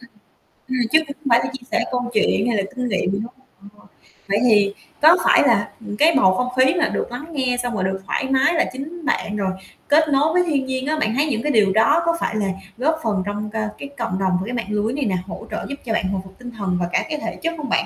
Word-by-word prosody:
ừm. 255 - -16 0.6
Ừm, 255 - -2
chứ 315 - +7
không 280 - -7
phải 235 0 +6
là - - -3
chia 255 -2 -9
sẻ - - +2
câu 245 -1 -1
chuyện 215 0 +2
hay 230 -3 +1
là 195 - +1
kinh 250 -1 -2
nghiệm 190 -3 0
giống 200 +2 -2 0.5
họ. - - -20 0.4
Vậy 200 +2 +2
thì 205 -2 +4 0.3
có 320 +4 +8
phải - - +6
là, - - +2
ừm, 205 0 -6
cái 320 +5 +5
bầu 190 -8 +5
không 250 +6 0
khí 260 +4 +5
là 340 -4 +1
được - - -3
lắng 245 +5 -6
nghe, 260 -4 0
xong 240 -1 -2
rồi 190 - -1
được 190 0 -2
thoải - - -1
mái 265 +5 +3
là 330 - +2
chính 315 +5 -7
bạn, 210 -6 -1
rồi 195 -2 0 0.4
kết 310 +2 +5
nối 290 +3 +2
với 360 0 +4
thiên 280 -5 0
nhiên 260 +1 -3
á, 310 0 0
bạn 220 +1 0
thấy 285 +3 +2
những 235 -7 -1
cái 295 - +1
điều 210 -6 +4
đó 225 +10 +4
có 335 0 +1
phải 220 - -2
là 205 -2 0 0.3
góp 315 +5 +1
phần 205 -5 0
trong 205 +1 -4
c - - -17 0.3
cái 280 - -7
cộng 210 -6 -2
đồng 185 -2 +1
và - - -3
cái 240 - -5
mạng 235 -4 -3
lưới 210 +2 -1
này 280 0 -1
nè, 190 -4 0
hỗ - - -8
trợ 215 - -4
giúp 280 - -3
cho 225 - -1
bạn 200 - 0
hồi 195 -1 -2
phục 190 0 -15
tinh 245 -1 -8
thần 195 -6 -2
và 175 - -1
cả - - +1
cái 300 - -2
thể - - -4
chất 330 +1 0
không 295 -2 -5
bạn? - - +2
245 Hz, 280 wpm, -21 LUFS, 205-285 Hz, 0.6 s, có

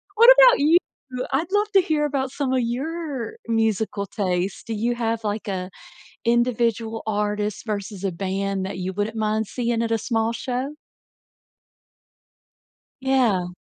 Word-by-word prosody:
What 465 +3 +8
about - - +8
you? 305 +4 +5 0.6
I'd 315 +7 0
love 415 +1 +1
to 385 - +7
hear 305 -3 0
about 270 -2 -1
some 270 -3 -1
of 255 - +2
your 275 +1 -3
musical 220 -2 0
taste. 185 -2 -2
Do 225 - -2
you 235 +3 0
have, 230 -1 -1
like, 210 0 -3
a 185 -2 -3 0.6
individual 230 -1 +1
artist 210 0 -1
versus 200 -2 -4
a 190 - 0
band 195 +1 -2
that 190 - -5
you 185 +1 -3
wouldn't 205 +3 -2
mind 215 0 0
seeing 235 -2 -1
at 230 - -2
a 225 - +3
small 225 -1 0
show? 255 +5 -3 2.3
Yeah. 245 -9 +2
225 Hz, 145 wpm, -23 LUFS, 205-260 Hz, 2.3 s, What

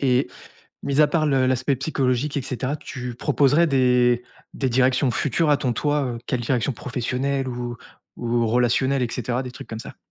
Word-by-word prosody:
Et 130 -1 +2 0.6
mis 140 +1 +2
à 150 - +6
part 155 +1 +1
le 135 -3 +2
l'aspect 130 +1 +1
psychologique 135 0 -1
et - - 0
cetera, 130 +3 -3
tu 130 -4 -6
proposerais 145 +5 +3
des 125 -3 +3 0.3
des 135 - -1
directions 130 +1 +2
futures 150 +6 0
à 145 - +4
ton 130 -4 -1
toi? 145 +3 0
Heu, - - -7
quelle 125 - 0
direction 120 +2 0
professionnelle 130 +3 -2
ou 120 -1 -4 0.4
ou 120 -1 0
relationnelle 125 +3 +2
et 120 -2 -1
cetera, 125 +1 -2
des 125 - -7
trucs 130 - -10
comme 110 - -6
ça? - - -10
130 Hz, 185 wpm, -23 LUFS, 125-140 Hz, 0.6 s, à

